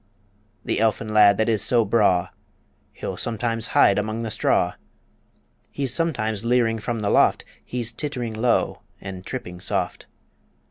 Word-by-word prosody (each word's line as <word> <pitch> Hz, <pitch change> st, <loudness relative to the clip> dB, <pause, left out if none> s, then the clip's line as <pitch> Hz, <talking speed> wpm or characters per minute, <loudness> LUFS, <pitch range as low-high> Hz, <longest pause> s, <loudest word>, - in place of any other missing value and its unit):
The -, -, -1 dB
elfin 110 Hz, 0 st, 0 dB
lad 105 Hz, -2 st, +6 dB
that 110 Hz, -, +1 dB
is 110 Hz, -3 st, +1 dB
so 120 Hz, -3 st, +3 dB
braw, 95 Hz, -4 st, +2 dB, 0.6 s
He'll -, -, -6 dB
sometimes 115 Hz, 0 st, -2 dB
hide 100 Hz, -, +5 dB
among 110 Hz, +2 st, -3 dB
the 110 Hz, -, -4 dB
straw; -, -, +1 dB, 1.0 s
He's 135 Hz, -3 st, -2 dB
sometimes 110 Hz, -, -1 dB
leering 115 Hz, -2 st, +2 dB
from 115 Hz, +1 st, -3 dB
the 100 Hz, -, 0 dB
loft -, -, +3 dB, 0.2 s
He's 120 Hz, -2 st, -4 dB
tittering 125 Hz, -4 st, -4 dB
low 115 Hz, +2 st, 0 dB, 0.2 s
and 95 Hz, -2 st, -8 dB
tripping 90 Hz, -7 st, -7 dB
soft. -, -, -2 dB
110 Hz, 140 wpm, -23 LUFS, 105-120 Hz, 1.0 s, lad